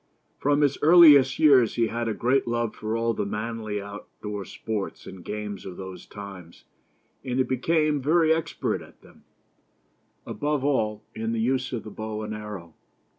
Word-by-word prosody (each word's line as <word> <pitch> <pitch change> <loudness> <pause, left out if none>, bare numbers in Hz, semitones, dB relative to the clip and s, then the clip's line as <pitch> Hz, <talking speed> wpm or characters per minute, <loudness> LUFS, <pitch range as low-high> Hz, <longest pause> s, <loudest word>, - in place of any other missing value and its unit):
From 145 +1 +2
his 140 -2 +2
earliest 150 -5 +7
years 135 -7 +5
he 115 - +2
had 115 +1 -3
a 110 - -1
great 125 +4 +1
love 120 -2 -1
for 110 +1 -3
all 115 0 0
the - - -2
manly 110 0 -4
out 100 +1 -9 0.2
door 105 -2 -4
sports 105 0 -5
and 95 -2 -10
games 105 -1 -5
of 90 -2 -8
those 95 -2 -9
times, 95 -5 -10 0.6
and 125 -2 -3
he 130 - +4
became 150 +3 +1
very 160 +3 +4
expert 160 -1 -2
at - - -16
them; - - -20 1.0
above 145 -2 -2
all, 110 -7 0
in 110 +1 -3
the 115 - -1
use 130 +3 0
of 120 -3 -4
the 110 - -9
bow 110 0 -5
and 105 0 -5
arrow. 105 -6 -8
115 Hz, 175 wpm, -25 LUFS, 105-135 Hz, 1.0 s, earliest